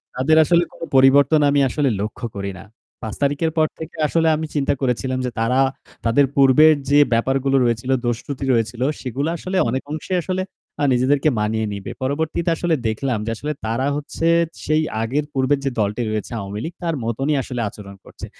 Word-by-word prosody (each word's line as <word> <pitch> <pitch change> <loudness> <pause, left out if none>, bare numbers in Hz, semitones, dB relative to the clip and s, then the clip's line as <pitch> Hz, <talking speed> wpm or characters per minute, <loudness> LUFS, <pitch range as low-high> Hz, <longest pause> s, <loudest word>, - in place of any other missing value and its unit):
তাদের 150 +5 +3
আসলে 170 +2 +3
কোনো 165 - -8
পরিবর্তন 140 +3 +6
আমি 140 0 +3
আসলে 140 0 0
লক্ষ্য 110 +3 -5
করি 100 0 -4
না। 95 - -11 0.4
৫ 110 -3 -5
তারিখের 145 +3 +1
পর 155 0 +4
থেকে 160 - -8
আসলে 165 +1 +1
আমি 160 +1 -3
চিন্তা 140 0 +1
করেছিলাম 130 0 -1
যে, 125 - -2
তারা 125 +4 +1 0.5
তাদের 135 +5 +4
পূর্বের 140 +3 +6 0.2
যে 145 +1 +5
ব্যাপারগুলো 135 +3 +1
রয়েছিল, 120 +2 -1
দোষ-ত্রুটি 125 +3 -3
রয়েছিল, 115 +1 -1 0.2
সেগুলো 140 +5 -2
আসলে 185 +3 -3
অনেক 130 +2 -2
অংশেই 180 +4 -2
আসলে 185 0 -2 0.4
আ - - +1
নিজেদেরকে 135 +4 +2
মানিয়ে 110 +1 0
নেবে। 100 -1 -6
পরবর্তীতে 160 +5 -1
আসলে 165 -1 0
দেখলাম 115 +1 -1
যে, 115 - -2
আসলে 150 +6 -4
তারা 115 +5 -1
হচ্ছে 150 +3 -3 0.4
সেই 155 +1 +2 0.2
আগের 140 +6 -1
পূর্বের 135 +1 +1
যে - - +2
দলটি 105 +3 0
রয়েছে, 110 +2 -3
আওয়ামী 100 +1 -5
লীগ, 165 - -5
তার 165 -2 -1
মতোনই 135 +6 -1
আসলে 125 -2 -4
আচরণ 100 -1 -11
করছে। - - -10
135 Hz, 180 wpm, -21 LUFS, 115-155 Hz, 0.5 s, পরিবর্তন